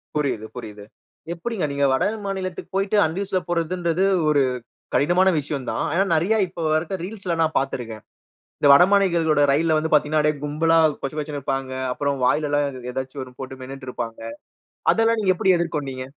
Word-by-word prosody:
புரியுது, 140 -7 -1
புரியுது. 105 -4 -8 0.5
எப்பிடிங்க 190 +2 -3
நீங்க 140 0 +1
வட 130 - +2 0.2
மாநிலத்துக்கு 190 -3 -4
போயிட்டு 195 +2 +1
அன்ட் 160 +3 -1
ரிசவர்டுல 190 -2 -2
போறதுன்றது 170 +1 0 0.3
ஒரு 145 -2 +3 0.5
கடினமான 175 +6 +3
விஷயம் 140 -2 -5
தான். - - -2
ஆனா, 190 +3 +2
நிறைய 190 +8 +2
இப்போ 170 -1 -8
வரைக்கும் 165 +3 -1
ரீல்ஸ்ல 190 -3 -3
நான் 160 0 +1
பார்த்து 135 0 -1
இருக்கிறேன். 110 -3 -8 0.6
இந்த 145 - +3
வடமாநிலங்களோட 170 -3 +4
ரயில் 155 +2 +2
வந்து 160 0 -2
பார்த்தீங்கன்னா, 150 0 +3
அப்பிடியே 150 -1 0
கும்பலா 165 +3 +2 0.2
கொசகொசன்னு 150 +1 -4
இருப்பாங்க. 135 -1 -3 0.2
அப்புறம் 140 +1 -2
வாயில 150 +4 +2
எல்லாம் 140 -4 -1
ஏதாச்சும் 130 +1 -5
ஒன்னு 125 -1 -17
போட்டு 130 0 -7
மென்னுட்டு 135 0 -8
இருப்பாங்க. 115 -2 -6 0.7
அதெல்லாம் 225 0 +2
நீங்க 190 -2 +3
எப்பிடி 185 +1 +3
எதிர்கொண்டீங்க? 140 -6 -3
155 Hz, 160 wpm, -22 LUFS, 135-180 Hz, 0.7 s, வடமாநிலங்களோட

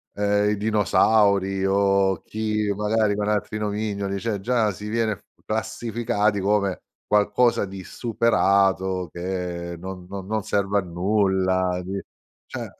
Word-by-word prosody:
ehm, 105 0 +2
i 105 - +1
dinosauri 100 -2 +2
o 100 -2 +2
chi 105 -1 -1
magari 105 0 +1
con 105 0 -2
altri 105 0 -1
nomignoli, 100 -2 -2
cioè 110 -1 -2
già 115 0 +1
si 105 +2 -8
viene 110 -2 0
f - - -27 0.2
classificati 110 -1 -1
come 100 -1 0 0.2
qualcosa 105 +2 +2
di 95 -1 -8
superato, 95 -5 +1
che 90 -1 -4
non 90 +1 -8
non 95 0 -7
non 110 +2 -1
serve 100 0 0
a 100 - +3
nulla, 95 0 +1
di 95 +2 -4 0.5
cioè, - - -6
100 Hz, 130 wpm, -24 LUFS, 95-105 Hz, 0.5 s, a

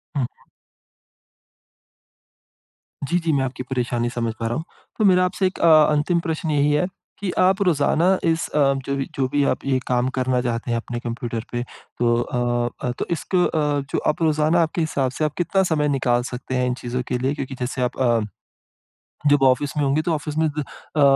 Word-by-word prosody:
हुँ। 135 -3 +1 2.8
जी, 175 - +2
जी, 165 -2 0
मैं 135 -2 +2
आपकी 130 0 -5
परेशानी 120 -2 -1
समझ 115 -2 -2
पा 115 - -1
रहा 115 - -2
हूँ। 160 - -3 0.3
तो 215 - +2
मेरा 185 -2 +5
आपसे 185 +1 0
एक 185 - -6
अ, - - +4 0.2
अंतिम 150 +4 +2
प्रश्न 160 -1 -2
यही 145 0 +3
है 150 +4 +2 0.3
कि 195 -3 -2
आप 190 +2 +3
रोज़ाना 175 +2 +3
इस 165 0 +1
अ, 140 -2 +3
जो 140 - -1
भी 135 -1 -2
जो 135 -1 +1
भी 145 +2 +1
आप - - -4
ये 135 -1 +1
काम 125 0 +1
करना 130 -1 +1
चाहते 120 0 -2
हैं 115 - +1
अपने 120 +1 -4
कंप्यूटर 120 -1 -4
पे, 120 0 -2
तो 120 -1 -2
अ 120 0 -1 0.2
अ, - - 0
तो - - -1
इसक 170 +3 -2
अ, 150 -5 +2
जो - - +2
आप 150 - -2
रोज़ाना 155 +1 +3
आपके 165 +1 0
हिसाब 140 -5 0
से 155 - -1
आप 150 - -2
कितना 190 +2 +2
समय 150 -2 +2
निकाल 125 -3 +1
सकते 125 +1 -5
हैं 125 0 +1
इन 125 - 0
चीज़ों 125 +1 -2
के 125 - 0
लिए? 130 +3 0
क्योंकि 135 -2 -5
जैसे 125 +1 -3
आप 125 - -1
अ, 120 -3 +3 1.1
जब 145 -1 +4
ऑफ़िस 135 +2 +3
में 150 - +2
होंगे, 140 +2 +2
तो 165 +1 -1
ऑफ़िस 150 0 -4
में 160 0 +3
द 150 - 0 0.3
अ 150 - +2
140 Hz, 205 wpm, -22 LUFS, 125-160 Hz, 2.8 s, मेरा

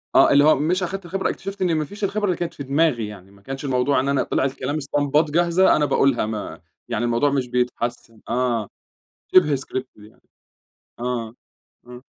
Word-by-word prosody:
آه. - - +6
اللي 145 +1 +6
هو 155 - +6
مش 180 +6 0
أخدت 190 +1 -4
الخبرة 190 +3 -2
اكتشفت 195 0 -6
إن 175 -3 +2
ما 155 -1 0
فيش 205 +6 -10
الخبرة 205 +1 0
اللي 185 -3 0
كانت 170 -1 -3
في 140 - -7
دماغي 135 -5 +1
يعني. 100 -2 -12
ما 100 0 -20
كانش 135 +4 -6
الموضوع 130 +1 +1
إن 135 +2 -1
أنا 140 - +2
طلع - - -1
الكلام 135 +1 -3
اسطمبات 145 +1 +1
جاهزة 175 +3 +4
أنا 150 - +2
باقولها 135 -5 +2
ما 110 -1 -5 0.3
يعني 120 0 -1
الموضوع 120 +5 +2
مش 135 -3 0
بيتحسّن 120 -2 -3
آه. 120 -3 0 0.7
شِبه 150 -6 +6
script 130 0 -5
دي 105 +1 -16 0.9
.آه. 120 -2 -3 0.5
آه. 125 +1 -12
135 Hz, 185 wpm, -22 LUFS, 120-160 Hz, 0.9 s, آه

